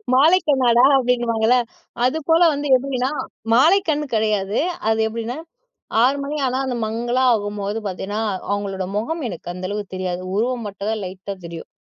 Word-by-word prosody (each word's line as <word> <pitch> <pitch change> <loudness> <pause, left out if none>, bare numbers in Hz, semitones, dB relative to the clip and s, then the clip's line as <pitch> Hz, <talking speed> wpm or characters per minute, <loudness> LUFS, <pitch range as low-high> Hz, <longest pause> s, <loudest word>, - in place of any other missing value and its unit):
மாலைக்கண்ணாடா 270 -6 +4
அப்பிடின்னுவாங்கல்ல. 240 -2 +2 0.5
அது 300 +5 +1
போல 325 +2 +5
வந்து 290 +1 -3
எப்பிடின்னா, 260 0 -2 0.4
மாலைக்கண் 310 +2 +4
கிடையாது. 210 -2 0 0.3
அது 220 0 +1
எப்பிடின்னா 230 +4 -4 0.7
6:00 270 +3 +4
மணி 295 +2 -4
ஆனா 255 +1 -1
அந்த 250 -2 -2
மங்கலா 240 +3 -1
ஆகும்போது 205 0 -3
பார்த்தீன்னா, 200 +3 -4 0.3
அவுங்களோட 195 -2 -2
முகம் 315 +9 -2
எனக்கு 175 0 -7
அந்த 185 0 -5
அளவுக்கு 205 -2 -5
தெரியாது. 185 -1 -3
உருவம் 235 0 -1
மட்டும் 200 +1 -6
தான் 220 -2 -2
லைட்டா 185 +2 -6
தெரியும். 165 -1 -8
230 Hz, 140 wpm, -21 LUFS, 205-260 Hz, 0.7 s, போல